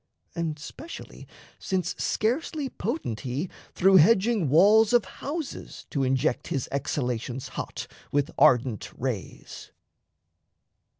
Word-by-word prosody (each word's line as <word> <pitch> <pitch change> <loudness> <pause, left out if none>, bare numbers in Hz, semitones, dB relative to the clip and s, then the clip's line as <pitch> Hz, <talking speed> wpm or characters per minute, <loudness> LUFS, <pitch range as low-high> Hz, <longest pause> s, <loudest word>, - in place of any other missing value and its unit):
And, 165 -3 -2
specially, 235 - -10 0.3
since 185 -2 -1
scarcely 275 +5 -1
potent 215 - -3
he 135 - -3 0.2
Through 190 +1 +6
hedging 200 - +4
walls 205 - +6
of 240 -4 +5
houses 295 - -6
to 140 - 0
inject 130 +1 +1
His 135 - -2
exhalations 125 -2 -2
hot, - - -5 0.3
with 145 0 +1
ardent 125 -3 +3
rays. 120 -6 -5
165 Hz, 105 wpm, -27 LUFS, 130-220 Hz, 0.3 s, Through